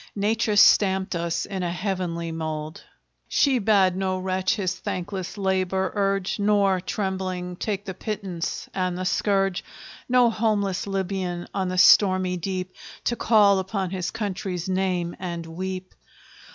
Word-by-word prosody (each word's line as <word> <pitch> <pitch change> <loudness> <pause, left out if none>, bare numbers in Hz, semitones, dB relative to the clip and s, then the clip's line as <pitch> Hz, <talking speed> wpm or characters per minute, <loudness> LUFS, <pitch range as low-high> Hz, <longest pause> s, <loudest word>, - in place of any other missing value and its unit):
Nature 215 +1 +1
stamped 190 -2 +5
us 170 0 -1
in 190 -2 -4
a 175 -1 -1
heavenly 175 -3 -3
mold! 155 -1 -5 0.4
She 270 -3 +3
bade 195 -4 +3
no 190 0 -1
wretch 185 +1 0
his 190 -4 -1
thankless 185 +1 -5
labor 190 -1 0
urge, 195 -1 0
Nor, 200 -2 +3
trembling, 185 -2 -3
take 205 +1 -3
the 190 - -4
pittance 190 -4 -4
and 185 -1 -1
the 185 - -3
scourge; 195 -1 +1 0.5
No 245 -1 +5
homeless 205 -4 0
Libyan, 190 -2 -2
on 190 -1 -1
the 185 0 -3
stormy 185 -1 +5
deep, 185 +1 -4 0.3
To 240 - 0
call 205 -5 +4
upon 190 -1 -3
his 185 -2 -2
country's 190 -5 -4
name 185 -2 -1
and 170 -2 -4
weep! 185 +3 -5
190 Hz, 140 wpm, -24 LUFS, 180-200 Hz, 0.5 s, stamped